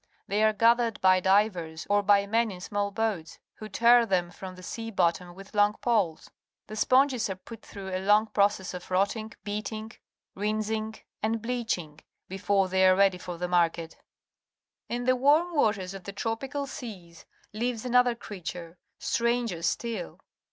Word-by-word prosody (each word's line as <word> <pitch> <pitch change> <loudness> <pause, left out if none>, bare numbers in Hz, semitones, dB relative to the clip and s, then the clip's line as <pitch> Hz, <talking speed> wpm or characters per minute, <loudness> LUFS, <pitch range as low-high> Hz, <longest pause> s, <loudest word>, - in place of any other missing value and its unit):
They 205 +1 0
are 215 - +5
gathered 230 +1 +3
by 185 0 +5
divers, 185 -5 +1
or 205 0 +3
by 200 0 +4
men 225 +2 +1
in 185 -3 -8
small 205 +2 -2
boats, 200 -6 -3 0.2
who 215 - -8
tear 235 +3 +5
them 180 -5 0
from 185 +1 -9
the 185 - -13
sea 225 +4 -5
bottom 175 -3 0
with 195 +1 -13
long 205 0 +4
poles. 205 -10 -1 0.3
The 215 - -8
sponges 255 0 +3
are 190 - -3
put 225 +4 -12
through 195 -2 -8
a 185 - -1
long 210 +2 +4
process 200 -3 +1
of 180 -1 -8
rotting, 205 +4 0
beating, 215 +1 -5 0.4
rinsing, 215 +2 -2 0.3
and 225 +1 0
bleaching, 220 -10 -3 0.3
before 195 0 +1
they 190 0 +2
are 185 - +6
ready 195 -1 +3
for 175 -1 -7
the 180 +1 -2
market. 170 -2 0 0.9
In 240 +1 -2
the 255 +1 +3
warm 300 +7 +3
waters 200 -9 +1
of 195 -2 -10
the 200 - -6
tropical 265 +7 -3
seas 190 -11 -9 0.3
lives 235 +1 -2
another 250 -1 +3
creature, 180 -5 -8 0.2
stranger 235 -6 0
still. 195 +3 -3
205 Hz, 160 wpm, -28 LUFS, 185-230 Hz, 0.9 s, are